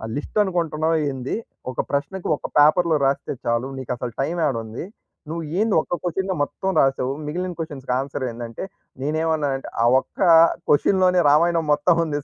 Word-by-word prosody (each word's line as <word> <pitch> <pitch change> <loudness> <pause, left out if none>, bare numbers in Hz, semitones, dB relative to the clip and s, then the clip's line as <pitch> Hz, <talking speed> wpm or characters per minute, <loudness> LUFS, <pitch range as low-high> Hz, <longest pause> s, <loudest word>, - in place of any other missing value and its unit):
List 145 - -5
అనుకుంటున్నావా 165 -3 0 0.2
ఏంది. 130 0 -4 0.4
ఒక - - -1
ప్రశ్నకు 145 +7 -2
ఒక - - -6
పేపర్‌లో 160 +2 +5
రాస్తే 135 +1 0
చాలు. 120 +2 0
నీకసలు 125 -2 -4
టైమ్ 170 +5 -2
యాడ 135 -5 0
ఉంది. 110 +9 -7 0.4
నువ్వు 165 0 -4 0.2
ఏంది 220 -1 +2
ఒక్క - - -6
క్వశన్‌నే 190 +2 -1
మొత్తం 190 +6 -3
రాసావు! 135 -1 +1
మిగిలిన 180 +3 -3
క్వశన్స్‌కి 140 -6 -4
ఆన్సర్ 135 0 -3
ఏందంటే" 115 +2 -7 0.4
నేనేమన్నానంటే 155 -3 -1
ఆ - - +4
ఒక్క - - -15 0.5
క్వశన్‌లోనే 180 +4 +4
రామాయణం 165 +1 +3
మొత్తం 165 +4 +3
ఉంది 145 -2 -2
155 Hz, 145 wpm, -22 LUFS, 135-175 Hz, 0.5 s, పేపర్‌లో